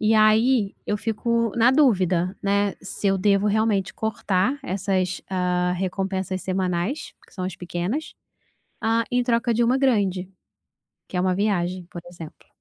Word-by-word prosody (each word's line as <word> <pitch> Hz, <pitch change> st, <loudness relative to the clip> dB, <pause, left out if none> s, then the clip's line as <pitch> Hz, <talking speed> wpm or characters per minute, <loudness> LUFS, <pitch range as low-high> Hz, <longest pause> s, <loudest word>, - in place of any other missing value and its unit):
E 215 Hz, +1 st, +3 dB
aí, 215 Hz, 0 st, +4 dB
eu 210 Hz, -, 0 dB
fico 230 Hz, +1 st, 0 dB
na 235 Hz, +2 st, +5 dB
dúvida, 190 Hz, -, +2 dB
né, 200 Hz, 0 st, +1 dB
se 195 Hz, +1 st, -4 dB
eu 195 Hz, 0 st, +2 dB
devo 200 Hz, +1 st, +2 dB
realmente 210 Hz, -2 st, +1 dB
cortar 220 Hz, +2 st, 0 dB
essas, 190 Hz, -3 st, -1 dB
ah, 180 Hz, -1 st, 0 dB
recompensas 190 Hz, 0 st, -2 dB
semanais 185 Hz, -, -2 dB
que -, -, -22 dB
são 185 Hz, -, -4 dB
as 185 Hz, -1 st, -4 dB
pequenas. 180 Hz, -, -4 dB, 0.7 s
Ah, 225 Hz, +1 st, +1 dB
em 245 Hz, 0 st, +2 dB
troca 235 Hz, 0 st, +1 dB
de 235 Hz, +2 st, +2 dB
uma 250 Hz, +3 st, +2 dB
grande. 195 Hz, -8 st, +1 dB, 0.8 s
Que -, -, -9 dB
é -, -, +2 dB
uma 185 Hz, 0 st, +1 dB
viagem, 185 Hz, -3 st, -1 dB
por 175 Hz, -, -8 dB
exemplo. 170 Hz, -3 st, -11 dB
200 Hz, 150 wpm, -24 LUFS, 185-225 Hz, 0.8 s, na